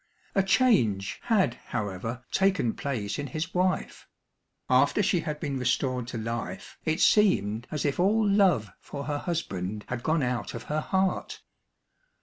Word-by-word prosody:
A 195 - +4
change 190 - +2
had, 215 -5 +2
however, 115 +2 -4
taken 190 - +2
place 115 -7 -3
in 145 - -3
his 155 +6 -4
wife; 185 +1 -1 0.6
after 210 - +3
she 190 -2 +2
had 150 -2 -4
been 140 -3 -3
restored 125 0 0
to 120 - -5
life, 110 -5 -5
it 160 +2 0
seemed 120 - +3
as 150 -1 -3
if 145 +2 0
all 210 +4 +3
love 190 - +3
for 140 -1 -7
her 145 0 -2
husband 105 - -3
had 125 -1 -3
gone 160 +2 +1
out 125 -1 -2
of - - -6
her 150 +1 -1
heart. 190 +3 -1
145 Hz, 150 wpm, -27 LUFS, 115-185 Hz, 0.6 s, A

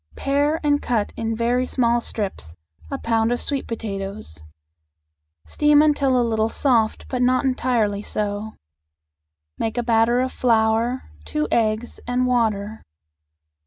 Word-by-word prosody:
Pare 290 +3 +1
and 290 -1 +2
cut 225 -4 -1
in 225 0 -2
very 245 +3 0
small 240 -2 +1
strips 190 - -5 0.3
a - - -3
pound 225 0 +1
of 245 - 0
sweet 280 -2 -2
potatoes. 195 - -6 1.1
Steam 295 -1 +3
until 280 -4 +2
a 240 - +2
little 220 -1 +1
soft, 230 -4 +1
but 255 -2 -2
not 255 +2 +2
entirely 235 -6 0
so. 210 +1 -3 1.1
Make 225 +1 -2
a 240 - +1
batter 230 +1 +3
of 255 0 0
flour, 230 +1 +1 0.2
two 150 - -2
eggs, 220 +1 0
and 250 +1 +1
water. 220 -4 0
230 Hz, 130 wpm, -22 LUFS, 220-255 Hz, 1.1 s, Steam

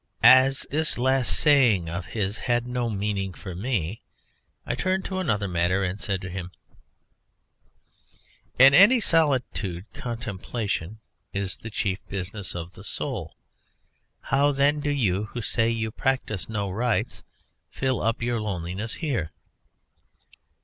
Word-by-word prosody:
As 135 +1 +6
this 155 +2 +3
last 130 0 +2
saying 120 - +4
of 85 +2 -5
his 100 +4 -2
had 120 -1 0
no 125 -1 -2
meaning 100 -2 -2
for 95 - -8
me 100 -1 -2 0.6
I - - -2
turned 190 0 -1
to 190 -1 -3
another 110 - 0
matter 90 +2 +1
and 95 +2 -3
said 95 -2 -1
to 95 - -6
him: 90 -1 -5 2.1
"In 135 +2 +8
any 205 - +8
solitude 130 - 0
contemplation 110 -4 -4 0.4
is 100 -1 -3
the 110 - -8
chief 100 -3 -2
business 95 0 -5
of 85 +1 -6
the 100 - -13
soul. 105 - -2 0.9
How, 140 +1 +2
then, 145 +2 +2
do 145 0 -2
you, 105 -8 0
who 120 +2 -6
say 115 0 +1
you 110 -1 -2
practise 110 -7 -2
no 100 -3 -2
rites, 120 +4 -1 0.5
fill 130 -2 -1
up 115 +1 -1
your 120 -1 -1
loneliness 95 +1 -4
here?" 115 - -1
110 Hz, 135 wpm, -25 LUFS, 95-130 Hz, 2.1 s, In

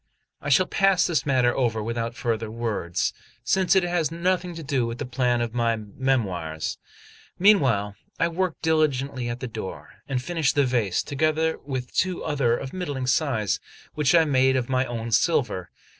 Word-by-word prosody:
I - - -4
shall 185 +6 +5
pass 195 -2 +3
this 160 -6 0
matter 125 -3 +3
over 115 -4 0
without 115 +1 -3
further 115 -3 -2
words, 110 -7 -2 0.3
since 190 +9 +2
it 190 - +4
has 175 -3 0
nothing 180 +1 -1
to 165 - -7
do 135 -4 0
with 115 +1 -5
the - - -4
plan 125 -1 0
of 120 -1 -2
my 115 -1 +1
'Memoirs.' 100 -8 -2 0.6
Meanwhile, 130 - +4 0.3
I 165 - +3
worked 175 0 -2
diligently 140 -6 +1
at 120 +1 -5
the 130 - -3
door, 110 -4 -8
and 135 -2 0
finished 160 +1 0
the 145 -1 +4
vase, 115 -8 0
together 155 +2 0
with 130 -3 -4
two 185 -1 0
others 135 -6 0
of 135 - -7
middling 145 -8 -3
size, 125 - +1 0.3
which 150 0 +2
I 165 -1 +6
made 130 -2 +3
of 125 -1 -1
my 130 0 +1
own 115 -1 -4
silver. 120 - +1
130 Hz, 175 wpm, -25 LUFS, 115-160 Hz, 0.6 s, I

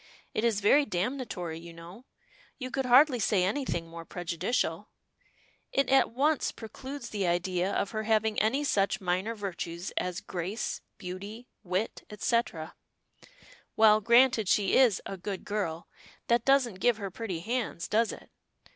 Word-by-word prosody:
It 215 - -1
is 225 -3 +2
very 280 +9 +5
damnatory, 185 - -3
you 170 0 -11
know. 170 +9 -12 0.5
You 255 -1 -6
could 265 0 -1
hardly 255 +1 +6
say 200 -3 +2
anything 190 -5 -1
more 165 0 -9
prejudicial. 175 +6 -2 0.8
It 275 -2 +1
at 270 0 +5
once 285 +5 +1
precludes 260 +3 -8
the 200 -4 -1
idea 180 +2 0
of 200 - -1
her 215 -1 -2
having 220 0 +1
any 260 +7 +1
such 200 -8 +1
minor 185 +5 -1
virtues 175 -3 -5
as 180 0 -1
grace, 185 +5 -4 0.2
beauty, 200 +6 -8
wit, 185 +3 -2
etc. 210 -6 -1 1.0
Well, 215 -1 +6
granted 235 -2 +4
she 200 -2 +3
is 245 -7 +4
'a 195 - -5
good 190 +1 -5
girl,' 175 -6 -3 0.4
that 235 -1 +3
doesn't 260 -8 +3
give 240 +2 +3
her 200 -3 -5
pretty 185 -5 -4
hands, 230 -4 -2
does 225 +1 +2
it? - - -12
210 Hz, 145 wpm, -29 LUFS, 180-240 Hz, 1.0 s, hardly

